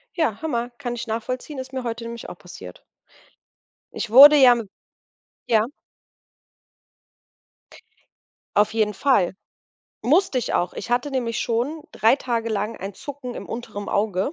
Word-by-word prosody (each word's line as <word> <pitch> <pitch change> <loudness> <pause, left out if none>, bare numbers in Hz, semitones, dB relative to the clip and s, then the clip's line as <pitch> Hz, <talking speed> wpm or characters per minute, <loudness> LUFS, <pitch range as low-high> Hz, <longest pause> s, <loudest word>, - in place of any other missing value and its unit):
Ja, 310 - -1
Hammer 245 -7 -2
kann 245 0 -5
ich 240 0 -6
nachvollziehen, 255 +6 -4
ist 260 0 -7
mir 260 -1 -4
heute 230 0 -4
nämlich 230 0 -7
auch - - -9
passiert. - - -12 1.1
Ich 240 - -4
wurde 285 +6 +10
ja 255 -3 +7
mi 235 - -3 0.8
ja? 220 -2 +3 2.9
Auf 210 +1 +3
jeden 215 -2 +1
Fall. 205 -6 +2 0.7
Musste 310 +1 +3
ich 245 - -3
auch. 175 - 0
Ich 215 - -7
hatte 245 +4 0
nämlich 240 -4 -2
schon 250 +7 -2
3 225 +4 +3
Tage 235 -4 -2
lang 215 +1 -2
ein 195 +1 -6
Zucken 265 0 -8
im - - -7
unteren 225 -3 -6
Auge. 200 - 0
240 Hz, 140 wpm, -23 LUFS, 220-260 Hz, 2.9 s, wurde